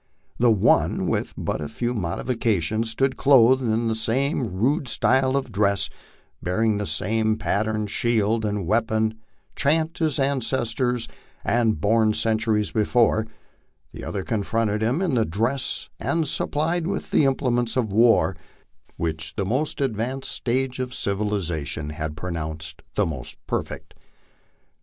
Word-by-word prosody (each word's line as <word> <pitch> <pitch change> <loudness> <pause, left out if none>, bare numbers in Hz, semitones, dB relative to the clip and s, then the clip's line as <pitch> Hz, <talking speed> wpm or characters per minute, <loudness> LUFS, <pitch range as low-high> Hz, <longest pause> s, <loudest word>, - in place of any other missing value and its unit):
The 120 0 +5
one, 105 -4 +3
with - - -1
but - - -2
few 120 +12 -2
modifica 110 +2 -1
tions, 110 +7 -1
stood 130 +4 0
clothed 130 -1 +5
in 115 -1 0
the 115 - +1
same 125 +4 +1
rude 135 - 0
style 130 +2 +3
of 130 -4 -3
dress, 100 -1 +1 0.5
bearing 105 +4 +1
the 105 - -2
same 110 +7 0
patterned 105 0 -1
shield 115 -1 +1
and 105 -3 -1
weapon 110 +2 0 0.4
chat 160 +4 +1
his 155 -4 +1
ancestors 125 -3 0 0.4
had 115 -2 +2
borne 110 +1 +3
centuries 110 -2 +1
before; 110 0 +2 0.6
the - - -9
other 100 - -3
confronted 110 0 -1
him 125 +11 +1
in 175 -7 0
the 115 -3 +3
dress 115 +9 -1
and 165 -2 0
supplied 160 +5 0
with 195 - -4
the 150 - +4
implements 125 -3 0
of 115 -5 0
war 115 +2 +4 0.6
which 80 -1 -3
the 100 - -1
most 135 +9 -1
advanced 130 +1 -2
stage 130 +1 -1
of 130 0 -3
civilization 85 -7 -2
had 75 0 -5
pronounced 80 -1 -5
the 105 - +2
most 75 -7 -6
perfect. - - -4
110 Hz, 135 wpm, -24 LUFS, 105-130 Hz, 0.6 s, The